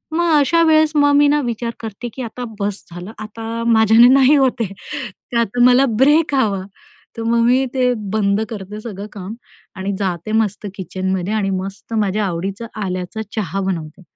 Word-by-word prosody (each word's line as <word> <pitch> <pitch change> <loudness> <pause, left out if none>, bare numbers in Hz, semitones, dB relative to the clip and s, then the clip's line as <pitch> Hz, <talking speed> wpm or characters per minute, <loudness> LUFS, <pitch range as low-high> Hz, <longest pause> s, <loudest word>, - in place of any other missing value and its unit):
मग 345 +1 +2
अशा 330 +4 +3
वेळेस 315 -1 +4
मग 290 -1 +4
मी 290 0 +5
ना 295 +1 +3
विचार 235 0 -3
करते 225 +1 -6
की 265 - -7
आता 245 +1 -6 0.2
बस्स 205 0 -3
झालं. 175 +4 -8
आता 225 +2 -5
माझ्याने 225 +1 +6
नाही 270 +2 +5
होत 265 -4 +2
आहे. 200 -4 -2 0.6
तर - - +1
आता 235 +1 +1
मला 250 +2 +6
ब्रेक 295 +3 +4
हवा. 210 -7 +1 0.6
तर 230 - -3
मग 230 +1 +2
मी 255 +3 +3
ते 250 -2 +2 0.2
बंद 205 -1 +1
करते 210 -1 -7
सगळं 205 -3 -7
काम, 200 0 -7 0.4
आणि 195 0 -3
जाते 185 0 -3
मस्त 215 -2 0
किचनमध्ये 190 +1 -3
आणि 210 -3 0
मस्त 195 +3 -5
माझ्या 210 -1 0
आवडीचा 195 +5 -4 0.2
आल्याचा 185 +3 -4
चहा 195 -3 -2
बनवते 175 -3 -4
220 Hz, 175 wpm, -19 LUFS, 195-250 Hz, 0.6 s, माझ्याने